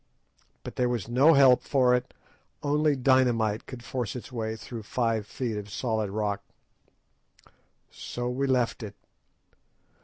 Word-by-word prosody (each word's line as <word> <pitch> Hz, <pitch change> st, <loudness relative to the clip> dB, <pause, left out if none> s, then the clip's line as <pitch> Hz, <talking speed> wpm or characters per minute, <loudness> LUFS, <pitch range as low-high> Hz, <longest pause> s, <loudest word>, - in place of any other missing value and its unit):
But -, -, -8 dB
there 125 Hz, -1 st, +2 dB
was 120 Hz, -5 st, -2 dB
no 135 Hz, +7 st, +5 dB
help 135 Hz, -3 st, +6 dB
for 130 Hz, -3 st, +3 dB
it. 125 Hz, 0 st, 0 dB, 0.5 s
Only 150 Hz, 0 st, +2 dB
dynamite 120 Hz, -5 st, +2 dB
could 125 Hz, -3 st, -9 dB
force 125 Hz, -5 st, -4 dB
its 125 Hz, -, -8 dB
way 110 Hz, -2 st, -3 dB
through 115 Hz, +1 st, -8 dB
five 115 Hz, -1 st, -1 dB
feet 120 Hz, -4 st, -3 dB
of 105 Hz, 0 st, -6 dB
solid 110 Hz, -1 st, -2 dB
rock. 105 Hz, 0 st, -2 dB, 1.5 s
So 120 Hz, 0 st, -5 dB
we 130 Hz, +3 st, -1 dB
left 125 Hz, -3 st, +1 dB
it. 105 Hz, -2 st, -7 dB
120 Hz, 135 wpm, -27 LUFS, 110-130 Hz, 1.5 s, help